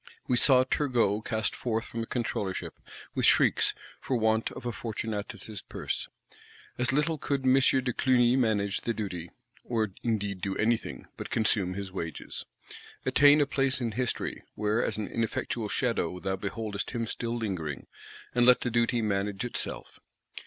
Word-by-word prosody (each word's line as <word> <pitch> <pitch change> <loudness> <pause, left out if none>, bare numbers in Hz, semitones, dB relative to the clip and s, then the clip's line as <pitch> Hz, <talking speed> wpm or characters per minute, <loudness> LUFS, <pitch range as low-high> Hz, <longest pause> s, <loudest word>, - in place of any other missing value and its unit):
We 125 - +2
saw 130 +2 +7
Turgot 120 -6 +1
cast 110 -2 -1
forth 115 -2 -2
from 115 - -5
the 115 - -4
Controllership, 105 -6 -2 0.4
with - - +2
shrieks,—for 130 - +2
want 110 0 +1
of - - -9
a 120 - -1
Fortunatus' 110 -1 -5
Purse. - - -3 0.7
As 125 0 +2
little 150 +3 +1
could 140 -1 -1
M. 130 0 +5
de 130 -1 +3
Clugny 125 -1 +3
manage 105 -6 +1
the 115 - -2
duty; 90 -5 -4 0.3
or 110 -4 -1
indeed 105 -5 -1
do 95 0 -2
anything, 115 +1 0
but - - -6
consume 100 -4 +1
his 100 -1 -5
wages; 85 -4 -6 0.6
attain 145 +1 +6
"a - - +4
place 135 -1 0
in 120 -3 -1
History," 125 +2 -2
where 105 +2 +1
as - - -1
an 105 - -2
ineffectual 115 -1 -2
shadow 100 -9 0
thou 95 +1 -1
beholdest 100 +1 -4
him 115 -1 -1
still 115 +1 -3
lingering;—and 95 - -4
let 125 0 +6
the 120 - -1
duty 120 0 +2
manage 100 +1 -1
itself. 120 - -3
115 Hz, 150 wpm, -29 LUFS, 100-125 Hz, 0.7 s, saw